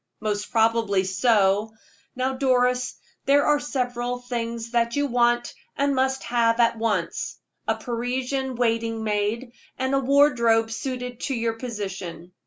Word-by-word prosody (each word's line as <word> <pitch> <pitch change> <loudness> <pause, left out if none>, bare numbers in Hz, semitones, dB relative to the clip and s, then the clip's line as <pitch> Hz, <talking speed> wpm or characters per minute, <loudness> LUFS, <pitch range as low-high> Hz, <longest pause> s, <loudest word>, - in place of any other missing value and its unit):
"Most 210 -1 -2
probably 225 -4 +2
so. 205 +1 +2 0.4
Now, 260 +1 0
Doris, 250 -1 +1 0.3
there 285 +1 +4
are 295 -1 +3
several 245 -3 -2
things 235 -2 -4
that 235 -1 +1
you 285 0 +1
want, 240 -2 +1 0.2
and 280 0 +2
must 265 0 0
have 230 -1 +2
at 230 -1 +3
once 210 -7 -1 0.3
a - - +2
Parisian 255 +2 -2
waiting 230 -1 0
maid, 215 +3 -1 0.3
and 260 +1 -1
a 275 - +4
wardrobe 250 -5 +3
suited 250 0 -4
to 270 - -2
your 230 -1 0
position. 195 -7 -6
240 Hz, 135 wpm, -24 LUFS, 225-255 Hz, 0.4 s, there